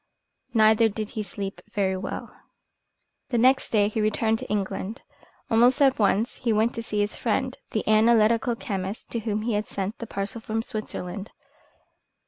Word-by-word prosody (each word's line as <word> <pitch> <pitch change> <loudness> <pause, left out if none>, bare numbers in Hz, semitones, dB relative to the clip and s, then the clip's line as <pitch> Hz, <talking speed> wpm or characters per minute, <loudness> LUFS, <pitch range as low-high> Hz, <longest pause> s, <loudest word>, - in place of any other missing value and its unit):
Neither 220 +1 +5
did 215 0 -5
he 215 - -3
sleep 195 0 -6
very 190 -2 +1
well. 185 +1 -6 0.9
The 245 - 0
next 260 +3 +4
day 205 -2 +3
he 215 +1 -2
returned 220 +1 +1
to - - -8
England. 205 +1 -3 0.5
Almost 245 +5 +5
at 270 -3 +4
once 210 +2 +2
he 235 - 0
went 220 +2 +2
to 230 - -4
see 210 -2 -2
his 205 +1 -1
friend, 255 +3 -1
the 215 - -2
analytical 225 +2 +4
chemist, 195 0 -5
to 235 - -1
whom 215 -1 -2
he 235 0 0
had 210 +1 -1
sent 200 +3 -4
the 230 - -6
parcel 200 +4 -3
from 225 0 -2
Switzerland. 205 -2 -5
215 Hz, 165 wpm, -25 LUFS, 205-230 Hz, 0.9 s, Neither